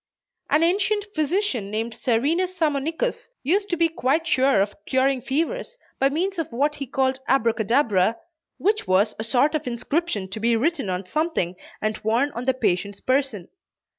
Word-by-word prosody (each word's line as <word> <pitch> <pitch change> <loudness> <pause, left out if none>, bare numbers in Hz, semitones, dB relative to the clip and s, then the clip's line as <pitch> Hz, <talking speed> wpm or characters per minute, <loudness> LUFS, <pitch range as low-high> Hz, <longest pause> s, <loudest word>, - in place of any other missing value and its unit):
An 310 - +4
ancient 410 +4 +1
physician 310 - 0
named 225 +2 -2
Serenus 295 +12 0
Sammonicus, 325 - -1
used 395 +9 +1
to 345 - 0
be 335 0 +4
quite 320 0 0
sure 270 -7 +3
of 200 +1 +1
curing 265 0 +2
fevers, 400 - -2 0.2
by 270 - +4
means 355 +5 -1
of 325 -1 -3
what 285 +5 +1
he 275 - -5
called 265 +1 0
Abracadabra, 230 -4 +2 0.4
which 425 +3 0
was 200 +4 +3
a - - -2
sort 255 +6 +2
of 310 -4 -2
inscription 245 - -1
to 210 +3 -5
be 230 +1 +2
written 275 - 0
on 185 +1 -2
something 305 - -1 0.3
and 215 0 -1
worn 235 +7 +1
on 240 -1 -5
the 260 - +3
patient's 200 -4 -1
person. 255 -8 0
270 Hz, 165 wpm, -24 LUFS, 225-330 Hz, 0.4 s, An